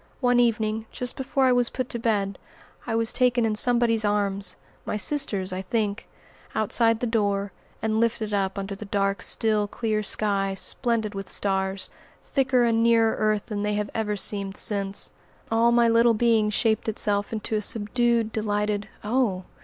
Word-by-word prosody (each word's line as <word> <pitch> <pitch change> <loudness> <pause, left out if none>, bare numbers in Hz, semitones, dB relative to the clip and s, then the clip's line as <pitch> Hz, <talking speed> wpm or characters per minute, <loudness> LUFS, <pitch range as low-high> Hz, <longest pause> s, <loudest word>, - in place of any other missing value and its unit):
One 245 -2 +3
evening, 220 -2 0
just 250 -1 -3
before 265 0 0
I 255 - +4
was 245 -1 +3
put 255 -1 -4
to 235 - -2
bed, 200 -4 -1 0.5
I 225 - -1
was 230 0 +1
taken 250 -2 +2
in 220 - 0
somebody's 230 0 +3
arms 200 -2 -1 0.3
my - - -3
sister's, 205 -7 +1
I 185 - -3
think 210 +2 -2 0.5
outside 225 +1 +5
the - - 0
door, 205 -3 0 0.3
and 220 0 0
lifted 225 -2 -1
up 195 -1 -1
under 195 0 -4
the 200 +2 -8
dark, 195 -1 -1
still, 215 0 +1
clear 215 0 -2
sky, 195 -2 0
splendid 225 +1 -1
with 195 -1 -6
stars, 190 -1 -1 0.3
thicker 260 -2 +1
and 230 -1 +2
nearer 230 -1 +3
earth 215 -1 0
than 210 -2 -4
they 210 0 -1
have 205 -1 -3
ever 210 -2 -1
seemed 200 -1 0
since. 200 -1 -1 0.4
All 230 +1 +3
my 235 0 +4
little 230 0 +4
being 225 -1 +2
shaped 220 +1 0
itself 205 -1 0
into 220 0 -4
a 210 - 0
subdued 230 +2 0
delighted 210 -1 -2
"Oh!" 210 -4 0
215 Hz, 170 wpm, -25 LUFS, 205-230 Hz, 0.5 s, outside